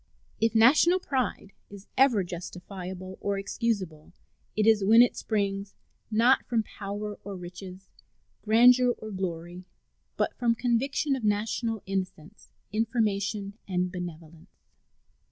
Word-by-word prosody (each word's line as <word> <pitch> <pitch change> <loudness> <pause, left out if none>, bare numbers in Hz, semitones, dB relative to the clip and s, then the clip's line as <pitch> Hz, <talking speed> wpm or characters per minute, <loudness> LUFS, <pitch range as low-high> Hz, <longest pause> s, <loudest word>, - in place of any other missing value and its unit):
If 225 0 +1
national 300 +11 +5
pride 255 - -2 0.2
is 200 0 -12
ever 255 -7 +4
justifiable 185 +1 -8
or 200 -1 -1
excusable 195 -7 -3 0.4
it 215 - +2
is 220 -2 +4
when 225 +4 +7
it 245 - 0
springs, 200 -2 -2 0.3
not 230 +4 +4
from 230 -3 +1
power 205 0 -6
or 200 -1 -6
riches, 185 +1 -10 0.5
grandeur 245 +3 +5
or 215 0 -8
glory, 175 -2 -5 0.5
but - - 0
from 235 -2 +2
conviction 260 +4 0
of 260 - -6
national 215 +1 -1
innocence, 190 -1 -5 0.2
information, 210 -2 -1
and 180 -1 -1
benevolence. 170 -1 -8
205 Hz, 120 wpm, -27 LUFS, 185-230 Hz, 0.5 s, when